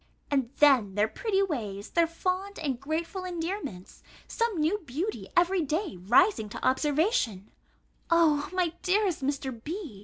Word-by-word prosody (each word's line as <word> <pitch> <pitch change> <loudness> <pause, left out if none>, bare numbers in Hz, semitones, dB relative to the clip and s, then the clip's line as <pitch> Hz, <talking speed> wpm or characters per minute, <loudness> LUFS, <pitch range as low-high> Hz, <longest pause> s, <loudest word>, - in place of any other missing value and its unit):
And 270 -4 +1
then 255 -10 +5
their 210 +1 +3
pretty 395 - 0
ways, 215 - -4
their 335 -1 +3
fond 370 +4 -3
and 275 -6 -2
grateful 325 +6 -3
endearments, 335 - -5 0.3
some 460 -7 -1
new 325 +7 +1
beauty 335 - -4
every 355 +1 +4
day 315 - -2
rising 220 - +3
to - - -3
observation 265 - +1 0.6
O 315 -4 +3
my 360 -3 0
dearest 375 -3 +1
Mr. 265 -4 -3
B. 315 - -6
315 Hz, 140 wpm, -28 LUFS, 255-370 Hz, 0.6 s, then